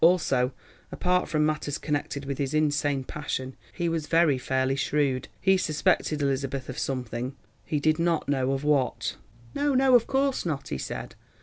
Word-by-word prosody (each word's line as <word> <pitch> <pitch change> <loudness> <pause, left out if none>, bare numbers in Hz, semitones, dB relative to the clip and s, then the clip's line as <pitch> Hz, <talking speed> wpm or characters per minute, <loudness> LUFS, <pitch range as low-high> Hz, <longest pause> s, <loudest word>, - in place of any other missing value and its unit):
Also, 140 -7 +4 0.4
apart 180 0 +1
from 155 -1 +2
matters 150 -1 -1
connected 145 -1 -3
with 140 -1 -4
his 140 +1 -1
insane 145 -2 +1
passion, 130 -2 -4 0.2
he 175 -2 -2
was 165 -2 -1
very 165 -5 +3
fairly 130 +1 0
shrewd. 140 -2 0
He 190 0 +4
suspected 155 -2 +1
Elizabeth 135 -1 -1
of 130 - -5
something, 130 0 -3 0.3
he 150 - -1
did 155 +2 +2
not 170 -1 +1
know 135 -2 +1
of 135 +1 -2
what. 140 -4 +1 0.4
"No, 285 -1 +1
no, 265 0 +4
of 240 -2 +6
course 270 0 +1
not," 155 -5 -3
he 65 - -3
said. - - -5
145 Hz, 170 wpm, -27 LUFS, 135-165 Hz, 0.4 s, of